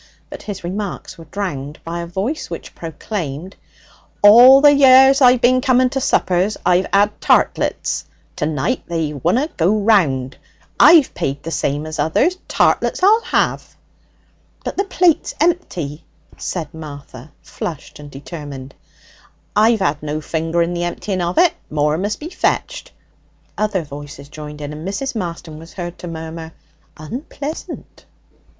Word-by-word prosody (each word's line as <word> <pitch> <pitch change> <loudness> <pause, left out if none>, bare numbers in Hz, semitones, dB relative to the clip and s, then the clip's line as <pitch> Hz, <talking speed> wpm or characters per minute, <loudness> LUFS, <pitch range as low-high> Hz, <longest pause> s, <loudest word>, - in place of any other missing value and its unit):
But - - -8
his 205 -4 -7
remarks 190 +1 -5
were 165 - -11
drowned 150 -5 -5
by 170 +1 -5
a 170 - -5
voice 200 - -3
which - - -8
proclaimed: 165 0 -6 0.7
'All 245 +6 +9
the 290 +1 +7
years 270 0 +6
I've 250 -1 +6
bin 255 +1 +4
to 255 0 +2
suppers 185 -2 +1
I've 180 +1 +3
'ad 205 +1 +2
tartlets! - - +1 0.3
To 150 - -1
night 160 - -1
they 165 -3 -2
wunna 175 - 0
go 180 +6 +2
round. 160 - +1 0.4
I've 320 -4 +7
paid 140 +1 -3
the 165 - -5
same 145 -1 -1
as 155 0 -6
others. 290 - +2
Tartlets - - +1
I'll 430 +4 +5
'ave!' - - +1 1.0
'But - - -4
the 395 - 0
plate's 360 -4 +1
empty,' 180 - -1 0.3
said 165 -5 -5
Martha, 145 -3 -10
flushed 160 -4 -7
and 145 0 -10
determined. 140 -2 -9 0.8
'I've 220 0 +3
had 145 -3 0
no 150 0 -3
finger 165 +2 -1
in 170 +1 -3
the 175 0 -2
emptying 185 +2 -3
of 175 +1 -2
it. 355 -2 +5 0.2
More 150 +1 0
must 205 +3 -2
be 315 - -7
fetched.' - - -2 0.6
Other 210 -4 -1
voices 145 -1 -10
joined 150 0 -9
in, 145 0 -6
and 155 +4 -7
Mrs. 205 +8 -3
Marston 170 -5 -6
was 165 +1 -13
heard 175 -2 -7
to 180 - -8
murmur, 160 0 -7 0.4
'Unpleasant.' 280 - -8
175 Hz, 145 wpm, -18 LUFS, 150-235 Hz, 1.0 s, All